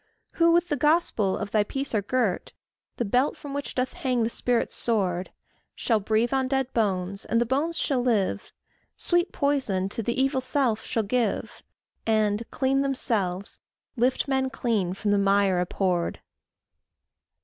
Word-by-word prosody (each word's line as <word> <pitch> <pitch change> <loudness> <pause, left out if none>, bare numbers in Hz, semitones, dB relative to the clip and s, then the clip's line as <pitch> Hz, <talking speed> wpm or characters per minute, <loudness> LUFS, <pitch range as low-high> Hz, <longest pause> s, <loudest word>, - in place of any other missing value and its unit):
Who 335 0 +4
with 345 +1 +3
the 295 - +1
gospel 295 - +2
of 200 - -5
thy 210 -1 +3
peace 270 +6 -3
are 210 - +2
girt, 215 -3 -1 0.4
The 240 - -1
belt 250 +7 +1
from 285 -1 -8
which 285 0 -4
doth 255 0 -1
hang 250 -3 0
the 225 - -1
Spirit's 245 0 0
sword, 190 -6 -1 0.4
Shall 225 -3 +1
breathe 220 +4 +1
on 265 -1 +1
dead 265 -1 -1
bones, 195 -3 -1
and 230 - +1
the 240 - +2
bones 295 +7 0
shall 270 -6 0
live, 210 -5 0 0.5
Sweet 350 +1 +1
poison 260 -10 0
to 230 - -2
the 235 +4 -2
evil 265 0 +2
self 255 -4 0
shall 225 -3 -1
give, 235 +3 -1 0.5
And, 215 0 +1
clean 270 0 +1
themselves, 205 -9 -1 0.4
lift 255 +4 +1
men 265 -1 +1
clean 210 -9 -1
from 205 +1 -1
the 205 - +3
mire 195 -2 +3
abhorred. 180 -1 -1
235 Hz, 160 wpm, -26 LUFS, 200-265 Hz, 0.5 s, Who